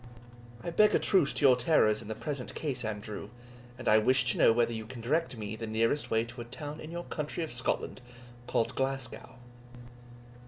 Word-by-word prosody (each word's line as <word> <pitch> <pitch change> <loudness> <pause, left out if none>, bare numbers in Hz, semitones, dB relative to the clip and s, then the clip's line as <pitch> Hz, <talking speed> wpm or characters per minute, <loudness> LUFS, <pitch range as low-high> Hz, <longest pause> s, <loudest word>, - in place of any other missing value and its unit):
"I 170 - -3
beg 210 +5 +5
a - - +4
truce 185 -8 +3
to 145 - +1
your 130 -2 +8
terrors 120 -5 +3
in - - -10
the 110 - -4
present 140 -2 -5
case, 135 -5 -3
Andrew, 105 -1 -5 0.5
and 125 - -7
I 110 - +6
wish 130 +3 +3
to - - -3
know - - +7
whether 120 0 +2
you 110 -1 -5
can 125 0 -8
direct 135 +2 -1
me 105 0 -5
the 115 0 -6
nearest 115 +6 +1
way 110 0 +2
to 120 +1 -8
a - - -7
town 145 +5 -7
in 155 - -8
your 170 +1 -5
country 155 +2 -4
of 160 - -5
Scotland, 125 +1 -1 0.5
called 115 0 0
Glasgow?" 135 0 -3
125 Hz, 200 wpm, -30 LUFS, 110-145 Hz, 0.5 s, your